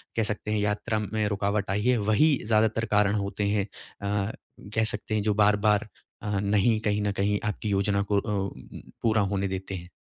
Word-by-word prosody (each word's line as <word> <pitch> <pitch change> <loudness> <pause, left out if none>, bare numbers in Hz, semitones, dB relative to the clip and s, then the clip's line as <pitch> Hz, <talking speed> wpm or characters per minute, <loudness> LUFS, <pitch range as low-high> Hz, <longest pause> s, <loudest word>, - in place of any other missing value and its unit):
कह 115 - +2
सकते 105 0 -2
हैं 110 - +1
यात्रा 105 +2 0
में 105 0 -1
रुकावट 100 0 -1
आई 100 +1 0
है, 125 0 +4
वही 110 +9 +3
ज़्यादातर 110 +1 +2
कारण 105 0 +3
होते 100 0 -2
हैं? 100 -1 +1 0.4
अ, 100 +1 -1 0.4
कह 110 - +3
सकते 110 0 -1
हैं 105 - +1
जो 105 0 +2
बार-बार 105 +1 +3 0.3
अ, 105 -1 -1
नहीं 105 +2 +2
कहीं 105 -1 0
न 105 0 0
कहीं 105 +1 +1
आपकी 105 +1 -2
योजना 100 0 +1
को 100 - +4
अ - - -4
अ, 105 - -1
उ 100 -1 0
उ - - -11 0.2
पूरा 110 -1 +3
होने 100 0 0
देते 95 0 -4
हैं? 90 -1 -8
105 Hz, 210 wpm, -27 LUFS, 100-110 Hz, 0.4 s, है